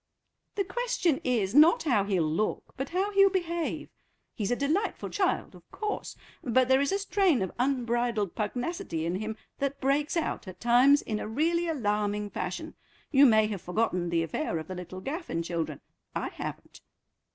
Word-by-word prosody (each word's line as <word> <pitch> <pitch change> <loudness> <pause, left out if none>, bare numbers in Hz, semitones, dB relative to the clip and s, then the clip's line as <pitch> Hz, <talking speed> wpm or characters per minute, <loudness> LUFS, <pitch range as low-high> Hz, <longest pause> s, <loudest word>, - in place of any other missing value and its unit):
"The 395 - +1
question 485 - 0
is, 225 -6 0
not 305 +5 +6
how 245 -10 +2
he'll 190 -4 +1
look, 160 +7 -2
but 270 +1 -4
how 385 +4 0
he'll 395 -1 +6
behave. 345 -3 -2 0.4
He's 210 -3 -2
a 245 - +2
delightful 310 - -1
child, 390 - 0
of - - -17
course, 425 -1 -4 0.3
but 255 -2 +3
there 265 +1 +4
is 280 - +1
a 395 - +2
strain 390 - +2
of 190 - -4
unbridled 240 -5 0
pugnacity 215 - -3
in 175 +2 -1
him 215 +2 -4 0.2
that 275 0 -2
breaks 290 +5 +1
out 320 - -2
at 185 - -9
times 250 +5 +5
in 215 -1 -3
a - - -4
really 335 +9 +1
alarming 210 -7 -1
fashion. 190 - -4 0.4
You 280 -1 +7
may 220 -2 +5
have 205 -4 -4
forgotten 180 -2 -1
the 170 -1 +1
affair 165 +1 -2
of 160 -1 -6
the 185 - -5
little 185 +1 -7
Gaffin 275 - -3
children; 165 -4 -3 0.3
I - - -2
haven't." - - -8
245 Hz, 175 wpm, -28 LUFS, 200-320 Hz, 0.4 s, You